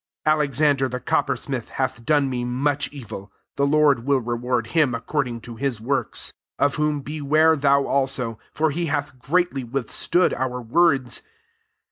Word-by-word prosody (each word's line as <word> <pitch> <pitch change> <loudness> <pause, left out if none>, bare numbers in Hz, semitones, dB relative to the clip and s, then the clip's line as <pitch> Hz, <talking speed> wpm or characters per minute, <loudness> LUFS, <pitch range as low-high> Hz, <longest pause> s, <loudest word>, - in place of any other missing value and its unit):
14 155 0 +5
Alexander 140 -1 +2
the 125 +1 -4
coppersmith - - -1
hath 115 - -3
done 145 +1 +2
me 125 -2 -2
much 140 +4 0
evil: 105 -7 -9 0.2
the 140 - +1
Lord 145 -5 +3
will 140 +1 +2
reward 120 0 -1
him 150 -7 +3
according 125 0 -2
to 115 +1 -10
his 135 -4 -1
works. 135 +5 -1 0.2
15 - - +3
Of 145 - +1
whom 150 -1 0
beware 155 +2 +2
thou 140 -1 +3
also; 130 -5 0
for 155 0 +1
he 170 +3 -2
hath 145 -3 -3
greatly 160 -1 0
withstood 135 +8 +1
our 125 0 -2
words. 130 +1 +2
140 Hz, 155 wpm, -23 LUFS, 125-150 Hz, 0.2 s, 14